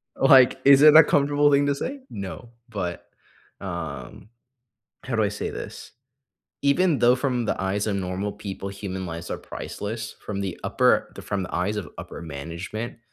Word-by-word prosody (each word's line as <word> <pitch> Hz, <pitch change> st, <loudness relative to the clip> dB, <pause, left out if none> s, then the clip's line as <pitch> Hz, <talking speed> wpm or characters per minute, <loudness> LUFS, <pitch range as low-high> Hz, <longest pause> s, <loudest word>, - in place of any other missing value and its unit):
Like, 130 Hz, -1 st, +6 dB
is 140 Hz, 0 st, +8 dB
it 155 Hz, 0 st, +8 dB
a 160 Hz, -, +11 dB
comfortable 145 Hz, 0 st, +3 dB
thing 140 Hz, 0 st, +4 dB
to 140 Hz, -, +1 dB
say? 275 Hz, -, -4 dB
No, 100 Hz, +4 st, -7 dB, 0.2 s
but, 95 Hz, -6 st, -5 dB, 0.6 s
um, 90 Hz, +2 st, -6 dB, 0.7 s
how 125 Hz, -3 st, -3 dB
do 110 Hz, -, +2 dB
I 100 Hz, -, +1 dB
say 105 Hz, -, -4 dB
this? -, -, -8 dB, 0.7 s
Even 150 Hz, +2 st, +3 dB
though 120 Hz, +1 st, +5 dB
from 125 Hz, -3 st, -1 dB
the -, -, -1 dB
eyes 100 Hz, +2 st, -1 dB
of 100 Hz, -2 st, 0 dB
normal 95 Hz, +2 st, -3 dB
people, 100 Hz, -1 st, -6 dB
human 95 Hz, -2 st, -5 dB
lives 85 Hz, +1 st, -7 dB
are -, -, -3 dB
priceless 110 Hz, +2 st, -6 dB
from 100 Hz, -1 st, -4 dB
the 95 Hz, -3 st, -4 dB
upper -, -, +2 dB
from 100 Hz, -1 st, -2 dB
the -, -, -7 dB
eyes 100 Hz, +4 st, -1 dB
of 100 Hz, -6 st, -4 dB
upper -, -, -8 dB
management, 85 Hz, +10 st, -6 dB
105 Hz, 170 wpm, -24 LUFS, 95-135 Hz, 0.7 s, a